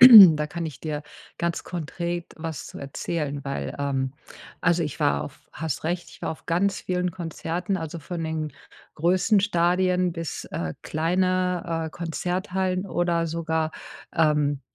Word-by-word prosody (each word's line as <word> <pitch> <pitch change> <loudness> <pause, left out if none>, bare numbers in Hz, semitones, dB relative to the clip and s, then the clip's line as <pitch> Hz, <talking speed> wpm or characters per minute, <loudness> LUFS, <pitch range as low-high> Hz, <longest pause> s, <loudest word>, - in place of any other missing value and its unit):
da 190 -12 +11
kann 170 +1 -4
ich 150 - -8
dir 150 -1 -3 0.4
ganz 170 0 -1
konkret 175 +1 -3
was 160 -2 -5
zu - - -9
erzählen, 145 +1 -3
weil 140 0 -3
ähm, 135 -2 0 0.5
also 170 0 +3
ich 150 - -4
war 70 0 +2
auf - - -12
hast 160 -4 -3
recht, 175 +2 -2
ich - - -15
war - - -2
auf 160 - -7
ganz 190 +3 +1
vielen 180 0 0
Konzerten, 175 +2 -3
also 165 0 -5
von 165 +2 -5
den 160 -1 -2 0.4
größten 185 +5 +4
Stadien 180 -1 +2
bis, 165 -2 -4
äh, 80 -2 -3
kleine, 180 0 +1
äh, - - -6
Konzerthallen 185 +3 -1
oder 170 -2 +1
sogar, 160 -1 0 0.4
ähm, 150 -3 +3
170 Hz, 145 wpm, -26 LUFS, 155-180 Hz, 0.5 s, da